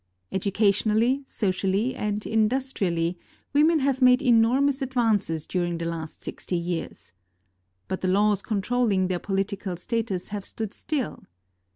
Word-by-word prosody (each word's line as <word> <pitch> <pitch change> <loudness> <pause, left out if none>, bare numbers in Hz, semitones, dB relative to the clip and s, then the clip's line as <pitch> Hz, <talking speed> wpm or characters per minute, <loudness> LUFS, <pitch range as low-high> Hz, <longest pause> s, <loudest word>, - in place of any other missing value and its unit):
Educationally, 215 +6 +2
socially, 195 +4 0
and 210 0 -3
industrially 210 -7 0 0.3
women 310 +3 +5
have 275 -2 0
made 250 +1 +6
enormous 255 +4 +3
advances 220 - 0
during 175 -2 -1
the 165 - -4
last 165 -2 -5
sixty 180 - -3
years. 170 - -5 0.7
But 190 - -3
the 185 - 0
laws 205 +1 +3
controlling 210 -2 0
their 180 -1 -1
political 195 -1 -2
status 205 -1 -2
have 205 -1 -4
stood 220 0 -5
still. 295 -6 -3
210 Hz, 125 wpm, -25 LUFS, 185-245 Hz, 0.7 s, made